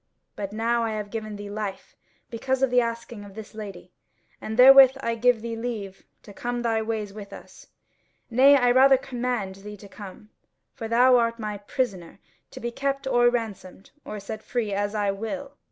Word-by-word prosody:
But 200 -1 -5
now 230 +2 0
I 225 -1 -2
have 210 -1 -5
given 215 -2 -5
thee 205 0 -8
life 205 -2 -6 0.4
because 260 +3 -1
of 265 - +2
the 250 0 +5
asking 230 -2 -5
of 200 -1 -13
this 220 0 -10
lady; 195 -5 -9 0.5
and 220 +1 -5
therewith 265 +1 +9
I 230 -3 -1
give 230 0 +2
thee 230 -1 -4
leave 225 -5 -6 0.2
to 205 - -13
come 240 +3 -4
thy 225 -1 +1
ways 215 -2 -4
with 205 -1 -10
us: - - -13 0.6
nay, 270 +4 +6 0.2
rather 270 +1 +7
I 260 - -5
command 240 -7 -3
thee 210 +1 -10
to 200 - -13
come, 205 +1 -12 0.4
for 225 - -6
thou 250 +2 +5
art 230 -1 +1
my 210 -3 -5
prisoner, 200 -5 -3 0.3
to - - -10
be 235 +1 -4
kept 275 +2 -2
or 240 -2 +4
ransomed, 210 -5 -5
or 210 - -7
set 215 +2 -7
free 220 -4 -3
as 205 +1 -2
I 205 -1 +1
will. 275 +8 -6
225 Hz, 185 wpm, -25 LUFS, 205-245 Hz, 0.6 s, therewith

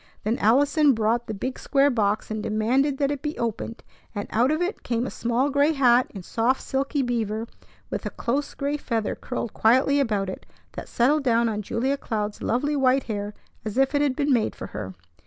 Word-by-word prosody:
Then 220 +4 0
Allison 285 +6 +4
brought 225 +2 0
the 220 - -3
big 255 +6 -4
square 280 0 +3
box, 215 -3 0
and 215 0 -2
demanded 250 +7 +1
that 280 0 +1
it 285 -2 -3
be 300 0 -4
opened; 230 0 -4 0.3
and 205 - -3
out 240 +4 +3
of 310 +1 +1
it 360 +5 -2
came 235 0 -1
a - - -4
small 240 +4 0
gray 285 +3 +3
hat 250 -3 +4
in 195 -4 -9
soft 235 +7 +1
silky 275 +1 -1
beaver, 225 -3 -1 0.5
with - - -3
a - - -2
close 280 +4 -2
gray 285 +1 -1
feather 230 -7 -2
curled 245 -3 -5
quietly 260 +5 +3
about 210 -7 0
it, 185 - -7 0.2
that - - -8
settled 285 +5 +2
down 235 -2 +3
on 210 -2 -2
Julia 260 +7 -1
Cloud's 210 -5 -3
lovely 285 +6 0
white 265 -1 +3
hair 205 -2 -4 0.3
as 215 +1 -5
if 270 +1 +3
it 285 - +2
had 280 -3 +1
been 285 0 +1
made 230 -3 +1
for - - -7
her. 95 0 -7
245 Hz, 205 wpm, -25 LUFS, 220-280 Hz, 0.5 s, Allison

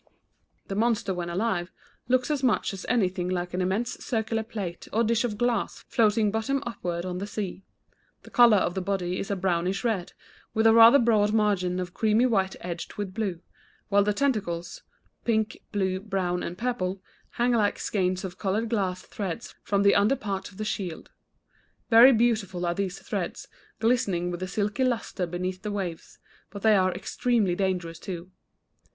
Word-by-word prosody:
The - - -4
monster 215 -2 +1
when 175 -1 -4
alive 180 -1 -1 0.4
looks 255 +3 +2
as 290 -3 0
much 250 -5 +1
as 190 - -7
anything 185 -6 +1
like 180 -1 -2
an 180 - -1
immense 195 +6 -1
circular 225 -1 -1
plate 200 -6 -6
or 225 +2 +2
dish 230 +1 +2
of 220 -4 -2
glass 240 -2 -1
floating 215 -2 +3
bottom 270 +6 -1
upward 175 -7 -4
on 180 -1 -3
the 200 - -4
sea. 200 -3 -4 0.6
The - - -14
color 235 -3 +7
of 180 - 0
the 190 - -2
body 185 -1 -2
is - - -4
a 200 - 0
brownish 185 +1 0
red, 215 -7 -1 0.4
with 220 0 +2
a 225 - +7
rather 230 +3 +9
broad 215 -4 +3
margin 195 -4 +1
of 180 -1 -4
creamy 220 +2 +3
white 195 -6 +1
edged 175 -1 -6
with 200 -2 -4
blue, 190 -5 -3 0.5
while 200 0 +4
the 210 - +1
tentacles 200 -9 -1 0.4
pink, 220 -2 0
blue, 190 -2 0
brown, 190 -3 -2
and 175 - -5
purple 200 -6 -2 0.3
hang 240 +1 +1
like 215 -4 +2
skeins 185 -2 -1
of 185 -1 -7
colored 215 +3 -1
glass 190 -5 -1
threads 200 +2 -5
from 200 0 +1
the 200 - +6
under 205 +6 +4
parts 200 -6 -4
of 195 - -17
the 215 - -3
shield. 185 -6 -4 0.8
Very 235 +4 +9
beautiful 215 -7 +1
are 170 - +1
these 190 0 -3
threads, - - -4 0.3
glistening 200 -7 +1
with 175 +1 -5
a 185 - -2
silky 205 +6 -1
lustre 230 -7 -1
beneath 185 +2 -4
the 210 - -4
waves, 185 -5 -5 0.3
but 200 -1 -9
they 220 -1 +6
are 185 -1 +3
extremely 225 -2 0
dangerous, 175 -3 -2
too. 180 0 -7
200 Hz, 175 wpm, -27 LUFS, 180-225 Hz, 0.8 s, rather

